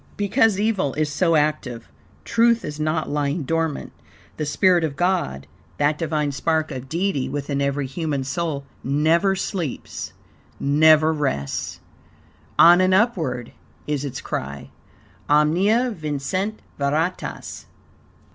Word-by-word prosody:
Because 205 Hz, 0 st, +2 dB
evil 205 Hz, -10 st, 0 dB
is 150 Hz, 0 st, 0 dB
so 165 Hz, +3 st, +2 dB
active, 145 Hz, -6 st, -1 dB, 0.4 s
truth 230 Hz, 0 st, +3 dB
is 150 Hz, 0 st, -6 dB
not 155 Hz, +1 st, 0 dB
lying 145 Hz, +2 st, -1 dB
dormant. 165 Hz, +1 st, -2 dB, 0.5 s
The 150 Hz, -, -2 dB
spirit 180 Hz, +2 st, +3 dB
of 150 Hz, -3 st, -2 dB
God, 175 Hz, -, 0 dB, 0.3 s
that 145 Hz, +1 st, +1 dB
Divine 155 Hz, -3 st, -1 dB
spark 155 Hz, +2 st, 0 dB
of 130 Hz, -1 st, -7 dB
Deity 170 Hz, -4 st, -1 dB
within 140 Hz, -1 st, -2 dB
every 140 Hz, 0 st, 0 dB
human 140 Hz, 0 st, -2 dB
soul, 140 Hz, +1 st, -3 dB, 0.2 s
never 160 Hz, +8 st, +2 dB
sleeps, 180 Hz, -, -4 dB, 0.5 s
never 155 Hz, +2 st, +5 dB
rests. 135 Hz, -, -3 dB, 0.8 s
"On 175 Hz, +2 st, +8 dB
and 185 Hz, 0 st, +4 dB
upward" 160 Hz, -, 0 dB, 0.3 s
is 145 Hz, -2 st, -2 dB
its 140 Hz, -3 st, -5 dB
cry. 70 Hz, +1 st, -5 dB, 0.6 s
"Omnia 185 Hz, +12 st, +3 dB
vincit 180 Hz, +5 st, -3 dB, 0.2 s
veritas." 155 Hz, +6 st, -2 dB
155 Hz, 120 wpm, -22 LUFS, 140-180 Hz, 0.8 s, On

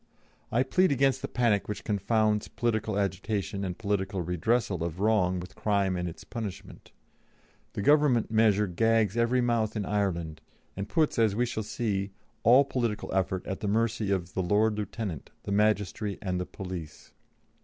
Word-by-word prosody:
I 120 Hz, +3 st, +3 dB
plead 185 Hz, +6 st, +2 dB
against 135 Hz, 0 st, +2 dB
the -, -, -3 dB
panic 115 Hz, -5 st, +1 dB
which 105 Hz, -, -5 dB
confounds 105 Hz, +1 st, +1 dB
political 110 Hz, -3 st, -1 dB
agitation 100 Hz, +1 st, -2 dB
and 90 Hz, -2 st, -3 dB
political 100 Hz, -3 st, -1 dB
redressal 90 Hz, +2 st, 0 dB
of 85 Hz, +1 st, -3 dB
wrong 100 Hz, -4 st, +2 dB
with 90 Hz, +1 st, -8 dB
crime 100 Hz, -3 st, 0 dB
and 90 Hz, -1 st, -2 dB
its 85 Hz, -, -11 dB
punishment; 110 Hz, -6 st, -7 dB, 0.8 s
the 100 Hz, -, -3 dB
Government 145 Hz, -5 st, +4 dB
measure 110 Hz, -2 st, +4 dB
gags 110 Hz, +2 st, +2 dB
every 120 Hz, +2 st, +2 dB
mouth 115 Hz, -2 st, 0 dB
in 105 Hz, -2 st, -2 dB
Ireland, 85 Hz, -7 st, -1 dB, 0.3 s
and 100 Hz, +2 st, -5 dB
puts, 155 Hz, 0 st, +1 dB
as 110 Hz, -3 st, +3 dB
we 120 Hz, +3 st, +2 dB
shall 115 Hz, -2 st, -3 dB
see, 100 Hz, -2 st, -2 dB, 0.3 s
all 130 Hz, +4 st, +6 dB
political 120 Hz, -6 st, -2 dB
effort 95 Hz, -1 st, 0 dB
at 95 Hz, -, -4 dB
the 105 Hz, -, -3 dB
mercy 110 Hz, 0 st, 0 dB
of 95 Hz, -2 st, -1 dB
the 95 Hz, -, 0 dB
Lord 105 Hz, +4 st, +2 dB
Lieutenant, 105 Hz, -, -5 dB
the -, -, -5 dB
magistracy, 105 Hz, 0 st, +1 dB
and 90 Hz, -3 st, -2 dB
the 90 Hz, -, -4 dB
police." 90 Hz, -5 st, -8 dB
105 Hz, 165 wpm, -28 LUFS, 95-115 Hz, 0.8 s, all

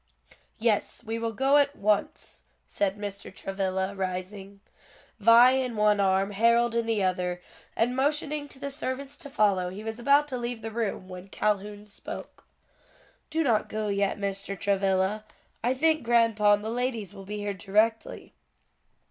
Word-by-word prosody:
"Yes, 225 Hz, 0 st, 0 dB
we 225 Hz, 0 st, -4 dB
will 230 Hz, 0 st, -2 dB
go 270 Hz, +5 st, +3 dB
at 285 Hz, 0 st, +2 dB
once," 210 Hz, 0 st, -1 dB, 0.2 s
said 200 Hz, 0 st, -1 dB
Mr. 200 Hz, -1 st, -7 dB
Travilla, 190 Hz, 0 st, -2 dB
rising, 195 Hz, +1 st, -5 dB, 0.6 s
Vi 230 Hz, +4 st, +7 dB
in 260 Hz, -3 st, -1 dB
one 210 Hz, -1 st, +3 dB
arm 195 Hz, 0 st, +2 dB
Harold 235 Hz, +3 st, +3 dB
in 230 Hz, -1 st, 0 dB
the 220 Hz, -3 st, +1 dB
other; 180 Hz, -1 st, -1 dB, 0.4 s
and 240 Hz, +2 st, +1 dB
motioning 295 Hz, +2 st, 0 dB
to -, -, -13 dB
the 280 Hz, +1 st, -5 dB
servants 275 Hz, 0 st, -4 dB
to 295 Hz, -4 st, -9 dB
follow, 200 Hz, -7 st, +2 dB
he 195 Hz, +4 st, -8 dB
was 225 Hz, +1 st, -5 dB
about 280 Hz, +4 st, +4 dB
to 255 Hz, -2 st, -3 dB
leave 240 Hz, -2 st, -4 dB
the 225 Hz, -, -4 dB
room, 215 Hz, -4 st, -3 dB
when 185 Hz, 0 st, -9 dB
Calhoun 205 Hz, +1 st, -2 dB
spoke. 210 Hz, -, -9 dB, 0.8 s
"Do 325 Hz, +1 st, 0 dB
not 225 Hz, -7 st, +1 dB
go 215 Hz, -1 st, -2 dB
yet, 200 Hz, 0 st, 0 dB
Mr. 200 Hz, -1 st, -4 dB
Travilla: 195 Hz, +1 st, +1 dB, 0.4 s
I 250 Hz, +2 st, +1 dB
think 315 Hz, +3 st, +2 dB
grandpa 230 Hz, -3 st, +3 dB
and 205 Hz, 0 st, 0 dB
the 220 Hz, -, -2 dB
ladies 235 Hz, -5 st, -2 dB
will 195 Hz, -1 st, -11 dB
be 210 Hz, +2 st, -5 dB
here 205 Hz, -1 st, -3 dB
directly." 210 Hz, +4 st, 0 dB
210 Hz, 160 wpm, -27 LUFS, 195-240 Hz, 0.8 s, Vi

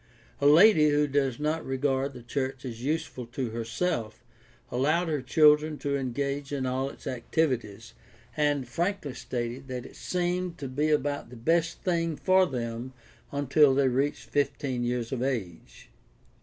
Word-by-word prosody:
A 140 Hz, -, +3 dB
lady 155 Hz, 0 st, +7 dB
who 145 Hz, 0 st, +3 dB
does 135 Hz, -3 st, 0 dB
not 155 Hz, +2 st, -1 dB
regard 135 Hz, +1 st, -1 dB
the 125 Hz, -2 st, -11 dB
church 130 Hz, +1 st, -3 dB
as 120 Hz, -1 st, -6 dB
useful 140 Hz, -4 st, -2 dB
to 120 Hz, -1 st, -4 dB
herself 115 Hz, 0 st, -3 dB, 0.5 s
allowed 155 Hz, +7 st, +1 dB
her 150 Hz, -3 st, -1 dB
children 150 Hz, +3 st, +4 dB
to 140 Hz, -1 st, -2 dB
engage 140 Hz, +2 st, -2 dB
in 140 Hz, -2 st, -2 dB
all 130 Hz, +1 st, -1 dB
its -, -, -14 dB
activities, 120 Hz, -5 st, -2 dB, 0.4 s
and 145 Hz, -4 st, +1 dB
frankly 170 Hz, +2 st, -2 dB
stated 125 Hz, +1 st, -5 dB
that 125 Hz, -2 st, -5 dB
it -, -, -12 dB
seemed 180 Hz, -1 st, -2 dB
to 140 Hz, -, -5 dB
be 145 Hz, +4 st, 0 dB
about 145 Hz, -1 st, 0 dB
the 125 Hz, -, -11 dB
best 165 Hz, +7 st, 0 dB
thing 165 Hz, -3 st, 0 dB
for 185 Hz, +3 st, +3 dB
them 120 Hz, 0 st, -4 dB, 0.4 s
until 140 Hz, 0 st, +4 dB
they 135 Hz, -1 st, +3 dB
reached 135 Hz, +4 st, -1 dB
fifteen 140 Hz, -3 st, -1 dB
years 120 Hz, -1 st, -2 dB
of 130 Hz, -3 st, -2 dB
age. 115 Hz, -11 st, -4 dB
140 Hz, 155 wpm, -28 LUFS, 125-150 Hz, 0.5 s, lady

